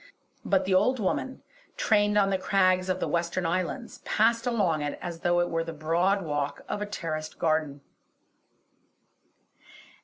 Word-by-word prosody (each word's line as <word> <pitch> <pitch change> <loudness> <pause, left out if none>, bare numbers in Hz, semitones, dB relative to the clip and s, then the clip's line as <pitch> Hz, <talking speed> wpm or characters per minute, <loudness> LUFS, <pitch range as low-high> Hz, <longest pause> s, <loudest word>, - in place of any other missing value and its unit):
But 195 -1 +1
the 190 - +1
old 225 +8 +3
woman, 260 +6 -2 0.3
trained 210 -1 +2
on 195 -1 +3
the 190 - +1
crags 185 -1 +2
of 185 0 0
the - - -1
western 170 +1 -1
islands, 185 +8 -2
passed 230 +2 +1
along 195 -10 +1
it 145 0 -3
as 170 -2 -6
though 175 0 +2
it 175 - 0
were 165 0 0
the 165 0 -6
broad 170 +6 +1
walk 145 -2 -3
of 205 - -3
a 210 - -2
terraced 155 -6 -5
garden. 155 -3 0
185 Hz, 155 wpm, -27 LUFS, 165-205 Hz, 0.3 s, old